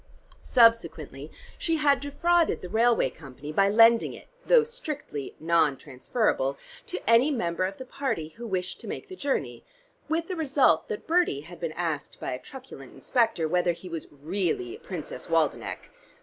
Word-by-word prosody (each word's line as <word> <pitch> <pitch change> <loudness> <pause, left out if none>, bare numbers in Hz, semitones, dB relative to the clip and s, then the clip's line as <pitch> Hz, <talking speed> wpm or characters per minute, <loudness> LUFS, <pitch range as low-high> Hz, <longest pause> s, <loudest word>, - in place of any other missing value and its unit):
Subsequently 230 -2 +2 0.3
she 330 - +1
had 290 -3 +3
defrauded 335 - +1
the 180 - -6
railway 230 - +3
company 145 0 -10
by 195 +5 +3
lending 230 +2 +5
it, - - -13 0.2
though - - +6
strictly 305 - -6
non 160 -4 +2
transferable, 140 - -1 0.3
to 180 - -6
any 230 +5 +6
member 185 - 0
of 195 +1 -4
the 260 - -8
party 240 - -3
who 235 +8 -9
wished 185 -3 -3
to - - -10
make - - -6
the 375 - -7
journey, 280 -6 -2 0.5
with 330 +1 0
the 370 - -3
result 275 - +3
that 210 - -5
Bertie 335 - +2
had 170 +3 -12
been 165 -2 -3
asked 160 -4 -3
by - - -4
a 125 - -4
truculent 255 - -11
inspector 225 -10 +1
whether 175 +1 +2
he 180 +2 -11
was 165 -2 -5
really 185 - -2
Princess - - -7
Waldenech. - - -1
220 Hz, 165 wpm, -27 LUFS, -, 0.5 s, though